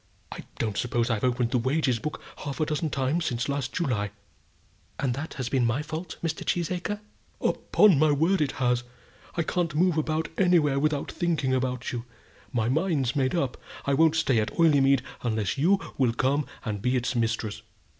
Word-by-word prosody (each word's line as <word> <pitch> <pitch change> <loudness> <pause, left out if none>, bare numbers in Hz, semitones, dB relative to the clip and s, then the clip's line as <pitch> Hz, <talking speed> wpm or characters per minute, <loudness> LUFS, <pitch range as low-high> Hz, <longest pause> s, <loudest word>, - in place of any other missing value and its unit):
I - - -8
don't 110 -3 -2
suppose 120 -1 0
I've 110 -2 -1
opened 125 -2 +1
the 125 - +2
wages 130 -1 +1
book 150 +6 -4 0.2
half 140 0 -5
a 155 - +2
dozen 155 +1 -1
times 140 +5 0
since 120 -3 -1
last 140 -3 -2
July." 115 - -1 0.9
"And 130 -4 0
has 150 +4 -4
that 130 -2 -5
been 130 -3 +2
my 120 +5 +1
fault, 160 +2 -6
Mr. 165 -1 -2
Cheesacre?" 180 +4 -2 0.4
"Upon 195 -9 +4
my 155 0 +5
word 165 +6 +2
it 145 -3 0
has. 125 -1 +1 0.5
I 170 - +1
can't 170 -2 -1
move 170 0 +3
about 155 0 -1
anywhere 165 -7 +4
without 150 -1 0
thinking 160 -7 0
about 125 -1 -1
you. 120 -1 -4 0.5
My 115 -4 0
mind's 145 -2 +1
made 135 +2 +1
up; 140 -7 -1 0.3
I 140 - +1
won't 160 +3 +4
stay 135 -7 +2
at 105 - 0
Oileymead 140 -6 +4 0.2
unless 110 0 -1
you 190 +7 +4 0.2
will 125 -4 +3
come 135 +4 +1 0.2
and 105 -3 -3
be 125 +3 +1
its 125 0 -1
mistress." 110 -2 -1
140 Hz, 180 wpm, -27 LUFS, 125-160 Hz, 0.9 s, my